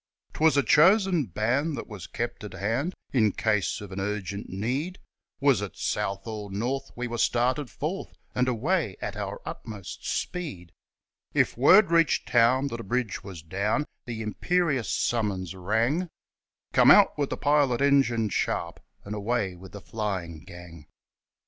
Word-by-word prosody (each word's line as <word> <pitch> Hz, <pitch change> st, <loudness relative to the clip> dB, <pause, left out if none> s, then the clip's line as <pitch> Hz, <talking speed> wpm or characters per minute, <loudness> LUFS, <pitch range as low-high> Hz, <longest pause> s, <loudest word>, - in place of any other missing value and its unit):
'Twas 155 Hz, -1 st, +3 dB
a 140 Hz, -, +4 dB
chosen 180 Hz, -, +4 dB
band 125 Hz, -, 0 dB
that -, -, -5 dB
was 105 Hz, -5 st, -9 dB
kept 120 Hz, -1 st, -4 dB
at 105 Hz, -, -7 dB
hand 125 Hz, -, -1 dB, 0.2 s
In 110 Hz, -5 st, +4 dB
case 105 Hz, -2 st, 0 dB
of 100 Hz, -2 st, -9 dB
an 95 Hz, -, -5 dB
urgent 100 Hz, 0 st, -4 dB
need, 130 Hz, -, -2 dB, 0.4 s
Was 135 Hz, -7 st, +3 dB
it 105 Hz, -, -6 dB
south 95 Hz, 0 st, -2 dB
or 105 Hz, -3 st, -6 dB
north 125 Hz, +7 st, -2 dB
we 125 Hz, -, -3 dB
were 120 Hz, 0 st, -4 dB
started 125 Hz, +4 st, +1 dB
forth, 165 Hz, +7 st, -5 dB, 0.2 s
And 125 Hz, 0 st, +1 dB
away 130 Hz, -, 0 dB
at 100 Hz, -1 st, -4 dB
our 100 Hz, -1 st, -4 dB
utmost 105 Hz, -5 st, -7 dB
speed. 90 Hz, -, -4 dB, 0.6 s
If -, -, +2 dB
word 175 Hz, -, +6 dB
reached 165 Hz, -3 st, +3 dB
town 125 Hz, +4 st, +3 dB
that 115 Hz, -, -5 dB
a -, -, -6 dB
bridge 120 Hz, 0 st, -2 dB
was 90 Hz, -6 st, -9 dB
down, 100 Hz, -, -1 dB, 0.2 s
The 115 Hz, -2 st, -5 dB
imperious 145 Hz, -, 0 dB
summons 100 Hz, -6 st, -1 dB
rang 115 Hz, -, 0 dB, 0.6 s
'Come -, -, +6 dB
out -, -, +7 dB
with 145 Hz, -2 st, -1 dB
the -, -, -3 dB
pilot 145 Hz, -4 st, +2 dB
engine 135 Hz, -6 st, +3 dB
sharp, 85 Hz, -3 st, -2 dB, 0.3 s
And 100 Hz, -, -5 dB
away 105 Hz, -2 st, -1 dB
with 95 Hz, +1 st, -12 dB
the 100 Hz, -, -8 dB
flying 95 Hz, -8 st, -4 dB
gang.' 85 Hz, -4 st, -12 dB
115 Hz, 155 wpm, -27 LUFS, 100-140 Hz, 0.6 s, out